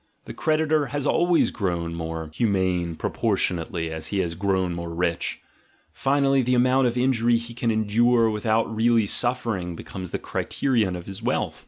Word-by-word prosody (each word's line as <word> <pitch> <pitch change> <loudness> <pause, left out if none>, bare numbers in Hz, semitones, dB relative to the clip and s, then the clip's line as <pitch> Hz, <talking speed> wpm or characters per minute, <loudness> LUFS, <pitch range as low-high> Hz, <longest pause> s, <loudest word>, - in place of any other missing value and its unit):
The - - -7
creditor 155 -1 +1
has 145 +2 -3
always 175 +2 +3
grown 85 -5 -2
more 80 -1 -5
humane 95 -5 0
proportion 90 - 0
ately 80 0 -4
as 80 0 -5
he 100 - -3
has 85 -3 0
grown 95 0 0
more 85 0 -5
rich; 85 0 -2 0.5
finally 135 0 +2
the 125 0 +1
amount 130 +1 +3
of 120 +1 -2
injury 120 -2 +3
he 115 0 -7
can 120 0 -1
endure 115 +2 +3
without 110 +1 0
really 115 0 +3
suffering 110 -7 -1
becomes 95 +1 -7
the - - -2
criterion 115 -9 -1
of 90 -1 -7
his 95 -1 -7
wealth. - - -1
110 Hz, 165 wpm, -24 LUFS, 90-125 Hz, 0.5 s, always